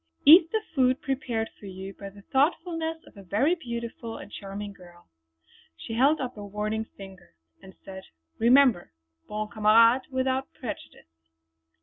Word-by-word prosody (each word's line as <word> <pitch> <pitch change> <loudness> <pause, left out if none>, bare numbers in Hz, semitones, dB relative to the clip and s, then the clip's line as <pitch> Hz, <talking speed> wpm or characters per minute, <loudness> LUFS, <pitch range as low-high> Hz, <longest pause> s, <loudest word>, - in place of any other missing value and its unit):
Eat 325 +3 +9
the 440 -1 -1
food 260 -2 +2
prepared 250 -5 -3
for 205 - -10
you 190 +1 -8
by 200 0 -9
the 200 0 -16
thoughtfulness 325 - -1
of - - -18
a - - -10
very 215 - +1
beautiful 235 -6 -6
and - - -11
charming 200 +1 -7
girl!" 175 -2 -17 0.7
She 225 - -7
held 275 +7 +3
up 255 -2 -4
a 205 - -7
warning 210 +2 -3
finger 190 - -13 0.3
and 190 0 -14
said: 190 -1 -9 0.3
"Remember 240 - +4 0.3
'Bon 215 0 -4
Camarade 230 +3 +4
without 260 0 -1
prejudice.'" 230 - -8
230 Hz, 145 wpm, -26 LUFS, 200-270 Hz, 0.7 s, Eat